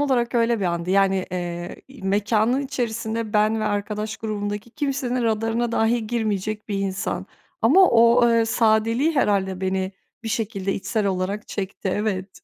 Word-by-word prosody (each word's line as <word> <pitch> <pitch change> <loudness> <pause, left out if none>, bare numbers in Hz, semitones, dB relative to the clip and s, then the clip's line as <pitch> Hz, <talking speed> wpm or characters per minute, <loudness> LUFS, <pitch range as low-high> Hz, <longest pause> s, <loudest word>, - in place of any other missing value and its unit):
olarak 250 -4 +1
öyle 230 -2 +2
bir - - -1
andı. 170 +1 -1
Yani, 195 -1 +2
eee, 175 -1 -4
i 270 -6 -14
mekânın 210 +5 +1
içerisinde 230 -4 -3
ben 215 +1 +2
ve - - -1
arkadaş 210 +1 -2
grubundaki 210 0 -4
kimsenin 265 -3 -2
radarına 225 +1 0
dahi 225 0 +1
girmeyecek 215 -2 -2
bir 200 -2 -1
insan 195 -1 -2 0.4
ama 360 - +6
o, 235 +1 +5
eee, 230 -1 +3
sadeliği 225 +6 +2
herhâlde 190 -7 +1
beni 190 0 -1 0.3
bir 225 - -4
şekilde 200 -3 -2
içsel 210 +1 -1
olarak 195 +2 -2
çekti. 195 0 -4
Evet. 195 -2 -3
215 Hz, 150 wpm, -23 LUFS, 195-230 Hz, 0.4 s, ama